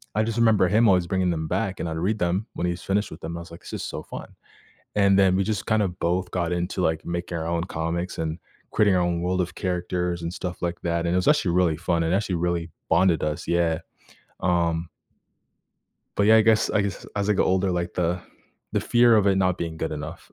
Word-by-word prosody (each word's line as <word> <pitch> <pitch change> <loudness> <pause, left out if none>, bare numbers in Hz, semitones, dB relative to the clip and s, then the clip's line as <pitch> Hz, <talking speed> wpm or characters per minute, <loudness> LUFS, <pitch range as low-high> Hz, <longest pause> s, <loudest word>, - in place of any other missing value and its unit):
I 110 - +3
just 115 +1 -2
remember 110 -5 +4
him 115 +3 +4
always 90 -3 +3
bringing 95 0 +1
them 80 -1 -2
back, 95 +3 -2
and 85 - -2
I'd 80 - -4
read 105 +6 0
them 90 +4 0
when 90 - -2
he's 85 0 -3
finished 105 +2 0
with 80 - -9
them. 85 +1 -5
I - - -6
was 85 - -12
like, 85 - -11
"This - - -11
is - - -4
so - - -5
fun." - - -8 0.7
And 100 -1 +4
then 95 -1 +4
we 100 - +2
just 105 -3 -2
kinda 105 -2 +2
both 90 +1 -1
got 90 -2 -1
into, 90 +1 -2
like, 80 -1 0
making 85 0 -3
our 80 - -3
own 85 0 0
comics 85 +1 -3
and 80 +2 -2 0.3
creating 100 -3 +3
our 90 - +3
own 85 -1 0
world 90 +1 0
of 90 - -4
characters 90 -1 -2
and 85 +1 -4
stuff 90 -2 -5
like 85 0 -3
that, 85 0 -1
and 85 - +1
it - - +3
was 90 - 0
actually 150 - +3
really 85 -4 +3
fun, 85 0 0
and 80 +2 0
actually 100 -3 -1
really 85 -1 -1 0.2
bonded 90 -4 +3
us. 75 -1 -3
Yeah. 85 -1 +1 0.6
Um 85 -2 +1 1.3
But, 100 - +3
yeah, 110 +1 +7
I - - +6
guess 110 -1 +3
I 105 - +2
guess 100 -1 -4
as 100 0 0
I - - +5
get - - +2
older, 95 0 +2
like, 85 0 -2
the 90 0 0 0.5
the - - +1
fear 120 -1 +4
of 105 - +3
it 100 -1 +4
not 90 -2 +2
being 80 -1 -4
good 80 0 -3
enough. 75 - -7
90 Hz, 240 wpm, -25 LUFS, 85-95 Hz, 1.3 s, yeah